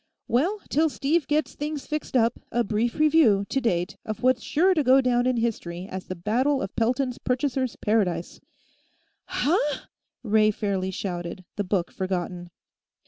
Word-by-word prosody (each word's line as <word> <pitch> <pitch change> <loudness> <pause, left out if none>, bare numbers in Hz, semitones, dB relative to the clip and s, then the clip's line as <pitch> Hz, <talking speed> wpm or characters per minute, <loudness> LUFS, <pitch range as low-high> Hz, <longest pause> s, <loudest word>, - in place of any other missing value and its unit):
"Well, 355 - +1
till 315 +2 +3
Steve 295 +2 0
gets 300 -2 0
things 295 -1 -4
fixed 305 -3 -2
up, 230 -1 +2
a 240 - +2
brief 225 +3 -1
review, 300 -10 +4
to 270 - 0
date, 180 -6 -1
of 215 +2 -6
what's 255 -1 +3
sure 365 +11 +3
to 310 -4 +1
go 260 +1 +6
down 250 -1 +2
in 255 -1 +1
history 190 -6 -2
as 190 -1 -7
the 185 - -4
Battle 250 +10 +1
of 195 - -6
Pelton's 250 +2 0
Purchasers' 260 -1 -1
Paradise 205 -6 0 0.5
" - - -43
"Huh?" 295 0 0 0.4
Ray 215 -1 +4
fairly 200 -3 -1
shouted, 180 -1 -5
the 205 - -1
book 180 -2 -1
forgotten. 180 -2 -3
235 Hz, 160 wpm, -25 LUFS, 195-275 Hz, 0.5 s, go